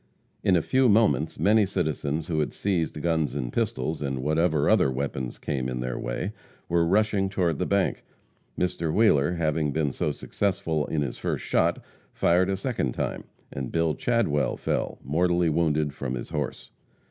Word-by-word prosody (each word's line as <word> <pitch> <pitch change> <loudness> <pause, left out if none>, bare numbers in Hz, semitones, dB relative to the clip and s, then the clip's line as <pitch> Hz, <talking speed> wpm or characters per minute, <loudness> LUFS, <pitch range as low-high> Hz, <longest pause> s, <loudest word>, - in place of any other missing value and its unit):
In 95 -3 +4
a 85 - +2
few 130 -1 +3
moments 105 -7 +3
many 110 +1 +4
citizens 80 -5 -1
who 80 -3 -1
had 75 - -1
seized 85 -6 -1
guns 80 -5 0
and 60 -1 -3
pistols, 110 -9 -1
and 65 -2 -2
whatever 80 0 +2
other - - +4
weapons 65 -2 -3
came 65 -3 -2
in 60 -1 -3
their 65 0 -3
way, - - -3 0.4
were 85 -1 +2
rushing 100 0 +2
toward 90 -4 0
the 90 - 0
bank. 100 -1 +1 0.5
Mr. 85 -3 -1
Wheeler 85 -7 +3
having 80 -3 0
been 75 -1 0
so 75 - -1
successful 80 -3 -1
in 75 -2 0
his 70 - -5
first - - -2
shot, - - +1 0.3
fired 90 +2 +3
a 95 - 0
second 100 - -2
time, - - -3 0.3
and 65 -2 -4
Bill 80 -1 +1
Chadwell 110 -12 0
fell, - - -2
mortally 85 +4 +2
wounded, 75 -2 +1
from 65 -3 -4
his - - -6
horse. - - -4
80 Hz, 170 wpm, -26 LUFS, 75-95 Hz, 0.5 s, In